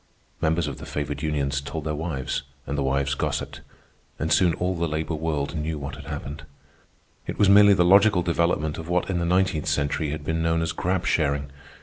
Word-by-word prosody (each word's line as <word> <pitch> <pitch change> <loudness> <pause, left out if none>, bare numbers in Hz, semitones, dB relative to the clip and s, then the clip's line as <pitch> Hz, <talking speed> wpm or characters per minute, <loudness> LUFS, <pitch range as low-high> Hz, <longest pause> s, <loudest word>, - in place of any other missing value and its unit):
Members 80 +1 +1
of 70 - -6
the - - -9
favored 75 -1 -4
unions 70 -3 -1
told 70 +3 -5
their 75 0 -2
wives, 75 -5 -3 0.2
and 70 - -3
the 70 - -1
wives 70 +1 0
gossiped, - - -3 0.6
and 80 0 0
soon 85 0 +4
all 90 +1 -1
the 85 0 -1
labor 80 +1 -2
world 75 -1 -2
knew 80 0 -2
what 70 -1 -6
had - - -11
happened. 70 +1 -6 0.9
It - - -4
was 100 - +4
merely 100 0 +7
the 90 -2 +3
logical 100 0 +5
development 85 -3 0
of 80 +1 -8
what 90 +2 0
in 90 - 0
the 85 - -1
nineteenth 90 -3 +1
century 75 +1 0
had 75 0 -4
been 80 +2 -1
known 80 0 +1
as 80 - -1
grab 90 +2 -1
sharing. 70 -3 0
80 Hz, 205 wpm, -25 LUFS, 75-85 Hz, 0.9 s, merely